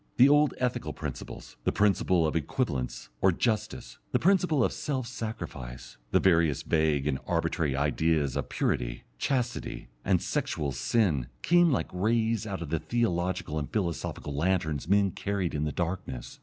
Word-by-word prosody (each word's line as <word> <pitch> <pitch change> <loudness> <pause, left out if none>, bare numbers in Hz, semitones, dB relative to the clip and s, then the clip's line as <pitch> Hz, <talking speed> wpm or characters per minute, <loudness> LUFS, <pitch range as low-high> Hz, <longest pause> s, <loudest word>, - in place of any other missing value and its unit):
The 130 +3 +8
old 145 -1 +4
ethical 125 -1 -1
principles, - - -7
the - - +2
principle 95 -4 +3
of 80 - -1
equivalents 70 - -2
or 95 - +5
justice, 90 - -2
the - - +3
principle 180 -6 +3
of - - +1
self 135 -4 -2
sacrifice, - - -6
the - - +4
various 85 -6 +3
vague 80 -3 +2
and 65 -3 0
arbitrary 75 -5 0
ideas 75 0 +1
of - - -2
purity, - - -1 0.2
chastity, 125 - -2
and - - +3
sexual 70 -2 -2
"sin," 75 - +1 0.2
came 175 -1 +5
like 125 - -1
rays 110 +3 +1
out 95 -4 -4
of - - -8
the 80 - +1
theological 90 -6 -1
and 70 - -5
philosophical 85 -7 -2
lanterns 80 -2 0
men 100 0 +3
carried 100 -3 -2
in 75 0 -1
the 75 - -1
darkness. 85 -8 -4
85 Hz, 155 wpm, -29 LUFS, 75-115 Hz, 0.2 s, The